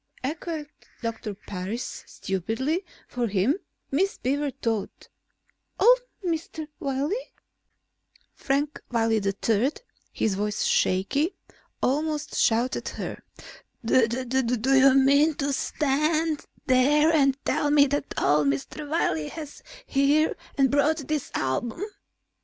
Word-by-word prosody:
echoed 310 Hz, +2 st, -4 dB, 0.4 s
Doctor 220 Hz, -3 st, -4 dB
Parris; 200 Hz, +5 st, -5 dB
stupidly, 225 Hz, -, -2 dB, 0.2 s
for 245 Hz, -1 st, -2 dB
him, 210 Hz, -, +1 dB, 0.3 s
Miss 380 Hz, +8 st, +1 dB
Beaver 285 Hz, +3 st, 0 dB
thought. 230 Hz, -6 st, -4 dB, 0.7 s
"Old -, -, +7 dB, 0.3 s
Mr. 320 Hz, -2 st, -3 dB
Wiley?" 285 Hz, -, -2 dB, 1.0 s
Frank 285 Hz, +2 st, -1 dB
Wiley 225 Hz, -2 st, +2 dB
III, 210 Hz, +6 st, +1 dB, 0.4 s
his 215 Hz, -, 0 dB
voice 210 Hz, +2 st, -1 dB
shaky, 275 Hz, -, +1 dB, 0.5 s
almost 300 Hz, +3 st, 0 dB
shouted 235 Hz, +3 st, +1 dB
at -, -, -5 dB
her. -, -, -5 dB, 0.6 s
"Do 250 Hz, +1 st, +1 dB
you 270 Hz, 0 st, +6 dB
mean 280 Hz, +3 st, +5 dB
to 280 Hz, 0 st, -1 dB
stand 305 Hz, +3 st, 0 dB, 0.2 s
there 295 Hz, +4 st, +4 dB
and 275 Hz, -3 st, +3 dB
tell 295 Hz, -, +1 dB
me 290 Hz, -1 st, +6 dB
that 285 Hz, 0 st, -2 dB
old 145 Hz, +1 st, +3 dB
Mr. 140 Hz, -, -3 dB
Wiley 160 Hz, -, 0 dB
was 300 Hz, -3 st, -8 dB, 0.2 s
here 290 Hz, +3 st, +2 dB, 0.2 s
and 270 Hz, -2 st, +4 dB
brought 290 Hz, +2 st, +3 dB
that 305 Hz, -3 st, -2 dB
album?" 225 Hz, -, -1 dB
275 Hz, 110 wpm, -26 LUFS, 225-300 Hz, 1.0 s, Old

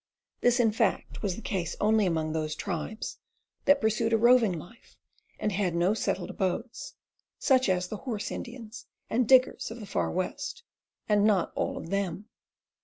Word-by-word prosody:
This, 245 Hz, +1 st, +3 dB
in 225 Hz, -3 st, +4 dB
fact, 220 Hz, -2 st, -1 dB
was 195 Hz, -4 st, -1 dB
the 230 Hz, -, -9 dB
case 175 Hz, -5 st, -2 dB
only 215 Hz, -1 st, +3 dB
among 160 Hz, -2 st, 0 dB
those 155 Hz, -1 st, -2 dB
tribes 200 Hz, +3 st, -4 dB, 0.5 s
that 285 Hz, 0 st, +5 dB
pursued 225 Hz, 0 st, +1 dB
a -, -, +6 dB
roving 230 Hz, -5 st, +5 dB
life 220 Hz, +10 st, -14 dB, 0.4 s
and 210 Hz, -, -1 dB
had 185 Hz, -3 st, 0 dB
no 175 Hz, +4 st, +3 dB
settled 195 Hz, -4 st, -2 dB
abodes, 195 Hz, +6 st, -3 dB, 0.4 s
such 260 Hz, -5 st, +3 dB
as 180 Hz, -1 st, +1 dB
the 215 Hz, -, -5 dB
"horse 220 Hz, -2 st, -4 dB
Indians" 230 Hz, -2 st, -8 dB, 0.2 s
and 235 Hz, 0 st, +2 dB
"diggers" 260 Hz, -1 st, +4 dB
of 225 Hz, +2 st, -8 dB
the 215 Hz, -, -7 dB
Far -, -, -1 dB
West 465 Hz, -, -3 dB, 0.2 s
— -, -, -58 dB
and 210 Hz, -1 st, +3 dB
not 205 Hz, -5 st, +3 dB
all -, -, -2 dB
of 165 Hz, -, -7 dB
them. 195 Hz, -1 st, -2 dB
210 Hz, 175 wpm, -28 LUFS, 185-235 Hz, 0.5 s, a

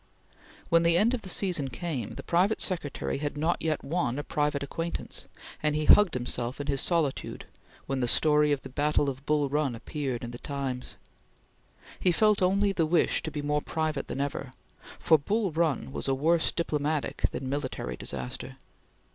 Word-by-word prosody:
When 165 Hz, 0 st, +5 dB
the 170 Hz, 0 st, +4 dB
end 220 Hz, +6 st, +3 dB
of 250 Hz, -, -2 dB
the 190 Hz, -, -8 dB
season 175 Hz, -8 st, +1 dB
came, 130 Hz, -3 st, -4 dB
the -, -, -7 dB
private 185 Hz, +6 st, +2 dB
secretary 155 Hz, -7 st, -2 dB
had 145 Hz, 0 st, -3 dB
not 160 Hz, +3 st, 0 dB
yet 155 Hz, -2 st, -1 dB
won 140 Hz, -5 st, -1 dB
a 145 Hz, -, -3 dB
private 145 Hz, -1 st, -1 dB
acquaintance, 165 Hz, +4 st, -4 dB, 0.3 s
and 150 Hz, -1 st, +1 dB
he 155 Hz, 0 st, 0 dB
hugged 205 Hz, -4 st, +6 dB
himself 125 Hz, +1 st, -2 dB
in 145 Hz, -, -3 dB
his 140 Hz, -2 st, +1 dB
solitude 165 Hz, -6 st, -1 dB, 0.4 s
when 135 Hz, -1 st, -2 dB
the 125 Hz, -, +1 dB
story 150 Hz, +3 st, +5 dB
of 140 Hz, -2 st, 0 dB
the -, -, -8 dB
battle 145 Hz, +1 st, +1 dB
of 130 Hz, +1 st, -13 dB
Bull 150 Hz, -1 st, +2 dB
Run 140 Hz, -3 st, 0 dB
appeared 130 Hz, 0 st, -4 dB
in 120 Hz, -, -5 dB
the 120 Hz, -, -8 dB
Times. 135 Hz, -3 st, -4 dB, 1.0 s
He 180 Hz, -, +3 dB
felt 210 Hz, +3 st, +3 dB
only 200 Hz, +2 st, +3 dB
the 170 Hz, -4 st, +1 dB
wish 170 Hz, +1 st, +2 dB
to -, -, -4 dB
be 145 Hz, -1 st, -5 dB
more 150 Hz, 0 st, +1 dB
private 155 Hz, 0 st, -2 dB
than 135 Hz, -, -3 dB
ever, 140 Hz, -2 st, -4 dB, 0.4 s
for 160 Hz, -2 st, +4 dB
Bull 200 Hz, +6 st, 0 dB
Run 160 Hz, -4 st, 0 dB
was -, -, -4 dB
a 135 Hz, -, +2 dB
worse 160 Hz, +4 st, +2 dB
diplomatic 150 Hz, -2 st, -1 dB
than 130 Hz, -, -5 dB
military 135 Hz, -, -3 dB
disaster. 65 Hz, 0 st, -5 dB
150 Hz, 180 wpm, -28 LUFS, 135-170 Hz, 1.0 s, hugged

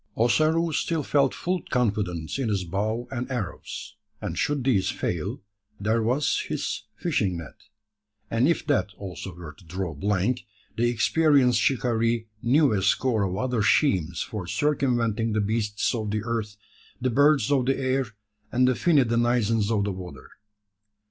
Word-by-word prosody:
Ossaroo 155 Hz, +8 st, +3 dB
still 160 Hz, 0 st, 0 dB
felt 140 Hz, -1 st, +2 dB
full 180 Hz, -1 st, -2 dB
confidence 100 Hz, -, -1 dB
in 125 Hz, -4 st, 0 dB
his 100 Hz, -3 st, 0 dB
bow 110 Hz, +7 st, -2 dB
and 125 Hz, 0 st, -4 dB
arrows; 120 Hz, -9 st, -5 dB, 0.2 s
and -, -, -4 dB
should 145 Hz, -3 st, 0 dB
these 115 Hz, -8 st, +2 dB
fail, -, -, -3 dB, 0.4 s
there 110 Hz, +3 st, +1 dB
was 125 Hz, +6 st, +1 dB
his -, -, -3 dB
fishing 90 Hz, -3 st, 0 dB
net; 80 Hz, -5 st, -11 dB, 0.7 s
and 115 Hz, +4 st, +3 dB
if 170 Hz, -, +1 dB
that 145 Hz, -7 st, +1 dB
also 95 Hz, -1 st, -7 dB
were 85 Hz, -3 st, -9 dB
to 95 Hz, -, -20 dB
draw 90 Hz, 0 st, -4 dB
blank, 105 Hz, -, 0 dB, 0.3 s
the 120 Hz, +1 st, +2 dB
experienced 125 Hz, 0 st, +3 dB
shikaree 115 Hz, -3 st, +1 dB, 0.2 s
knew 135 Hz, +2 st, +4 dB
a 100 Hz, -, +1 dB
score 110 Hz, +3 st, +2 dB
of 95 Hz, -1 st, -1 dB
other 125 Hz, -1 st, 0 dB
schemes 90 Hz, -, +2 dB
for 100 Hz, -5 st, -6 dB
circumventing 120 Hz, -4 st, 0 dB
the 110 Hz, -, +1 dB
beasts 105 Hz, 0 st, 0 dB
of 110 Hz, -3 st, -2 dB
the 105 Hz, 0 st, -1 dB
earth, 110 Hz, -3 st, -3 dB, 0.4 s
the 130 Hz, 0 st, 0 dB
birds 145 Hz, -1 st, +4 dB
of 130 Hz, -3 st, +2 dB
the 135 Hz, -, +2 dB
air, 130 Hz, -1 st, 0 dB, 0.4 s
and 125 Hz, +1 st, +3 dB
the 130 Hz, -, +4 dB
finny 150 Hz, +1 st, +3 dB
denizens 115 Hz, -2 st, +1 dB
of 110 Hz, -3 st, +1 dB
the 100 Hz, -, -1 dB
water. 90 Hz, -8 st, -9 dB
115 Hz, 155 wpm, -26 LUFS, 100-130 Hz, 0.7 s, knew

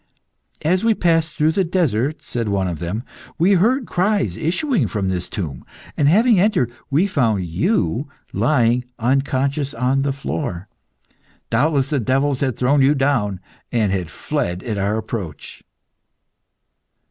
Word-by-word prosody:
"As 180 Hz, +5 st, +2 dB
we 225 Hz, -1 st, +3 dB
passed 165 Hz, -4 st, +1 dB
through 155 Hz, +1 st, +3 dB
the 190 Hz, +4 st, +1 dB
desert," 155 Hz, -, 0 dB
said 115 Hz, -5 st, -3 dB
one 95 Hz, -2 st, 0 dB
of 85 Hz, -4 st, -4 dB
them, 90 Hz, +8 st, -3 dB, 0.3 s
"we 180 Hz, +5 st, +3 dB
heard 235 Hz, +8 st, +3 dB
cries 200 Hz, +2 st, 0 dB
issuing 180 Hz, -, 0 dB
from 95 Hz, 0 st, -2 dB
this 90 Hz, -1 st, -2 dB
tomb, 80 Hz, -, -5 dB, 0.3 s
and, 145 Hz, -, +2 dB
having 215 Hz, -, +5 dB
entered, 180 Hz, -, +2 dB, 0.2 s
we 150 Hz, +7 st, +3 dB
found 115 Hz, -, +1 dB
you 140 Hz, -, 0 dB, 0.2 s
lying 125 Hz, -4 st, +2 dB
unconscious 135 Hz, +3 st, 0 dB
on 130 Hz, +2 st, +1 dB
the 140 Hz, 0 st, 0 dB
floor. 90 Hz, -8 st, -4 dB, 0.8 s
Doubtless 140 Hz, +3 st, +2 dB
the 145 Hz, -, +2 dB
devils 135 Hz, +3 st, +1 dB
had 130 Hz, -3 st, -1 dB
thrown 135 Hz, +3 st, +3 dB
you 140 Hz, +3 st, +4 dB
down, 120 Hz, -9 st, 0 dB, 0.3 s
and 110 Hz, -5 st, +1 dB
had 90 Hz, -4 st, -2 dB
fled 90 Hz, +4 st, -3 dB
at 110 Hz, -4 st, -3 dB
our 100 Hz, +3 st, 0 dB
approach." 100 Hz, -9 st, -6 dB
135 Hz, 145 wpm, -20 LUFS, 105-160 Hz, 0.8 s, having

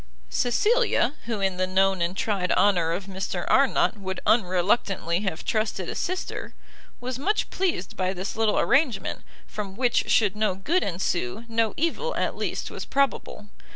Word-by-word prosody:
Cecilia, 420 Hz, -, +2 dB
who 225 Hz, -4 st, -2 dB
in 190 Hz, -2 st, 0 dB
the 185 Hz, 0 st, 0 dB
known 190 Hz, 0 st, +2 dB
and 175 Hz, +3 st, -1 dB
tried 195 Hz, -4 st, 0 dB
honour 180 Hz, -4 st, +3 dB
of 180 Hz, +3 st, -3 dB
Mr 190 Hz, -2 st, -4 dB
Arnott 270 Hz, -4 st, +3 dB
would 190 Hz, -1 st, -4 dB
unreluctantly 185 Hz, -3 st, +2 dB
have 190 Hz, -5 st, -3 dB
trusted 215 Hz, -5 st, -1 dB
a -, -, -3 dB
sister, 370 Hz, +1 st, -4 dB, 0.4 s
was 250 Hz, +1 st, -4 dB
much 415 Hz, +9 st, 0 dB
pleased 350 Hz, -, -1 dB
by 185 Hz, -1 st, 0 dB
this 190 Hz, +1 st, -4 dB
little 220 Hz, -1 st, +2 dB
arrangement, 270 Hz, -6 st, +1 dB, 0.2 s
from 200 Hz, -3 st, -6 dB
which 245 Hz, +1 st, +1 dB
should 210 Hz, -3 st, +3 dB
no 210 Hz, -3 st, +1 dB
good 315 Hz, -, +1 dB
ensue, 175 Hz, -, -2 dB
no 225 Hz, -1 st, 0 dB
evil, 335 Hz, +10 st, -1 dB
at -, -, -1 dB
least, -, -, -3 dB
was -, -, -6 dB
probable. 275 Hz, -6 st, -1 dB
205 Hz, 155 wpm, -25 LUFS, 185-245 Hz, 0.4 s, honour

